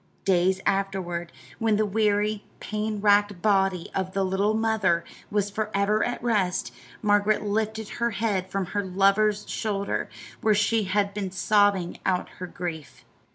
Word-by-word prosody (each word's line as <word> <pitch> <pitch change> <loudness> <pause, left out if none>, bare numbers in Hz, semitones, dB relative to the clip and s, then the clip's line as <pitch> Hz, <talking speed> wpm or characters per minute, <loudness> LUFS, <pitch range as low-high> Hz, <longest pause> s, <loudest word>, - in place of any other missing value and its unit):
Days 190 0 +2
afterward, 190 -3 -1 0.3
when 225 -1 +2
the 215 +1 +2
weary, 210 0 +1 0.2
pain 215 -1 -3
racked 205 -2 +3
body 195 -4 +2
of 190 -1 -2
the 195 0 +1
little 195 +3 +1
mother 215 -6 +1 0.2
was 205 -1 0
forever 210 0 0
at 245 -1 -3
rest, 200 -6 0 0.3
Margaret 205 0 +3
lifted 220 +1 -1
her 235 +3 -1
head 205 -4 -1
from 195 -1 -1
her 205 -1 0
lover's 200 +3 +2
shoulder, 200 -3 -2 0.3
where 215 -2 +3
she 210 +1 +2
had 200 +1 0
been 200 -2 -3
sobbing 200 -2 +2
out 185 -1 0
her 180 - -5
grief. 170 -4 -7
205 Hz, 145 wpm, -26 LUFS, 190-215 Hz, 0.3 s, racked